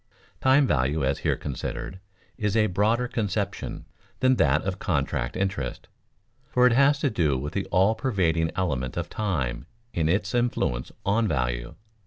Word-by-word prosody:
Time 135 +2 +5
value, 70 - +1
as 70 +1 0
here - - +1
considered, 75 +6 -5 0.4
is 105 0 0
a 110 - +4
broader 110 +6 +1
conception 105 -3 -3 0.3
than 130 -1 +3
that 70 +2 +3
of 95 0 -3
contract 75 -9 -1
interest, 95 -11 -3 0.6
for 125 0 +4
it 125 - +5
has 140 +3 +5
to 140 -1 0
do 75 -10 +1
with 75 +3 -5
the 100 - -1
all 95 +4 +3
pervading 90 -9 +1
element 70 -9 -2
of - - -3
time 75 - -2 0.3
in 80 -2 +1
its 100 +3 0
influence 120 - 0
on 110 +3 +2
value. - - -2
95 Hz, 155 wpm, -26 LUFS, 70-110 Hz, 0.6 s, Time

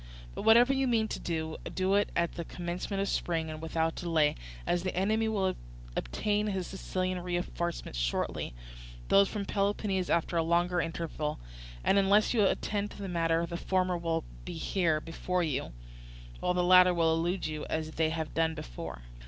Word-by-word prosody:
But - - -5
whatever 240 +4 +6
you 270 0 +1
mean 225 -3 +2
to - - -3
do, 160 -2 -3 0.2
do 190 +1 +1
it 205 +1 +3
at 170 0 +1
the 170 - -4
commencement 175 +4 -4
of - - -2
spring 165 -4 -1
and 155 0 -7
without 160 0 0
delay, 160 -4 +2 0.3
as 175 - +1
the 185 +1 -3
enemy 215 +4 +2
will 195 -4 0 0.4
obtain 210 - 0
his 190 -3 -1
Sicilian 185 -1 -2
reinforcements 175 - -3
shortly, - - -1 0.5
those 195 0 +6
from 205 -2 -3
Peloponnese 195 -2 0
after 170 0 +1
a - - +4
longer 175 +2 +2
interval; 165 -2 -3 0.4
and 200 - +4
unless 200 +4 +4
you 220 -3 +4
attend 205 +1 0
to - - -12
the - - -3
matter 165 -1 +1
the 170 0 -5
former 185 0 +1
will 165 -1 -1 0.2
be 180 - -6
here 160 -2 +1
before 175 +3 -2
you, 150 - -2 0.7
while 180 - 0
the 180 - +2
latter 180 0 +7
will 165 -1 +3
elude 175 +3 0
you 155 -1 -4
as 155 0 -2
they 160 0 +1
have 160 -1 -3
done 160 0 +1
before." - - -7
175 Hz, 175 wpm, -30 LUFS, 165-195 Hz, 0.7 s, latter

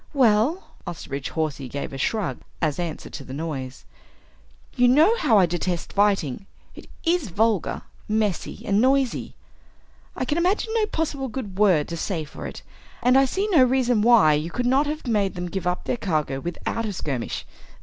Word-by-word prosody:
"Well," 255 - +2
Osterbridge 140 -5 -5
Hawsey 150 -5 -3
gave 140 +2 -5
a - - -5
shrug 215 - -1 0.2
as 155 -2 0
answer 170 -3 -4
to 140 - -7
the 130 0 -8
noise, 140 -4 -5 0.9
"you 245 -1 +4
know 310 - +5
how 235 -8 +4
I 190 - +6
detest 175 0 -3
fighting. 195 -5 +1 0.3
It - - -12 0.2
is 335 - +1
vulgar, 215 +1 0 0.2
messy, 210 -3 -1
and 200 0 +2
noisy. 265 0 +1 0.8
I 255 - -2
can 295 +6 0
imagine 395 +5 +1
no 440 -2 +2
possible 290 -6 -2
good 210 -6 -6
word 180 -8 +4
to 170 - -4
say 165 -1 -2
for 150 - -8
it. - - -9 0.4
And 250 +1 +5
I 270 0 +6
see 385 +10 -1
no 320 -10 +6
reason 250 -3 +2
why 220 -9 +6
you 150 +3 -1
could 245 +7 -2
not 270 +4 +3
have 300 0 -4
made 205 -5 +1
them 175 0 -4
give 190 -2 -3
up 180 0 -1
their - - -2
cargo 155 - -1
without 175 +8 -3
a 205 - -3
skirmish. 135 -9 -4
210 Hz, 180 wpm, -24 LUFS, 165-260 Hz, 0.9 s, I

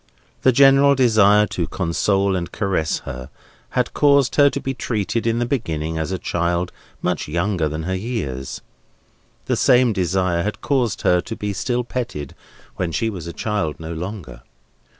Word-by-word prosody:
The 130 - +5
general 140 +2 +6
desire 105 -5 +5
to 85 -5 -3
console 95 +3 0
and 90 -1 -3
caress 95 -7 -1
her, 65 +1 -7 0.5
had - - +1
caused 140 -3 +4
her 145 -1 +6
to - - -4
be 135 - -3
treated 115 -2 -2
in 115 0 +1
the 120 - 0
beginning 80 - -2
as 80 +3 -2
a 95 - -1
child 85 0 -1 0.3
much 90 -3 -1
younger 85 0 0
than 80 +2 -4
her 95 +3 -2
years; 90 - -4 0.8
the - - +1
same 125 -2 +4
desire 90 -2 0
had 105 +4 -3
caused 125 -7 0
her 90 0 +4
to 110 +6 -6
be 105 -2 -3
still 120 +5 -1
petted 120 - -5 0.4
when 90 -2 -1
she 115 +7 -1
was 90 -5 -7
a - - -4
child 100 -9 -2
no 80 +1 -6
longer. 90 +2 -7
95 Hz, 170 wpm, -21 LUFS, 85-120 Hz, 0.8 s, general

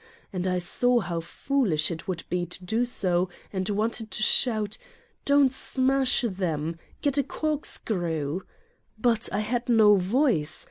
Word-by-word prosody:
And 185 0 -2
I 180 0 +1
saw 245 +7 +2
how 175 -6 -3
foolish 170 - 0
it 165 -1 -6
would 180 -3 -3
be 175 -1 -1
to 180 +1 -9
do 225 +6 +1
so 185 -6 0 0.2
and 190 +1 -2
wanted 220 +2 -1
to 215 - -3
shout: 215 -3 +2 0.2
" - - -37
Don't 280 -2 +4
smash 265 0 +2
them. 165 -5 -3 0.2
Get 285 -1 +1
a - - +3
corkscrew!" 180 - -2 0.6
But 230 0 +1
I - - 0
had 240 +3 -2
no 215 -3 +6
voice. 190 - +2
210 Hz, 150 wpm, -26 LUFS, 175-245 Hz, 0.6 s, no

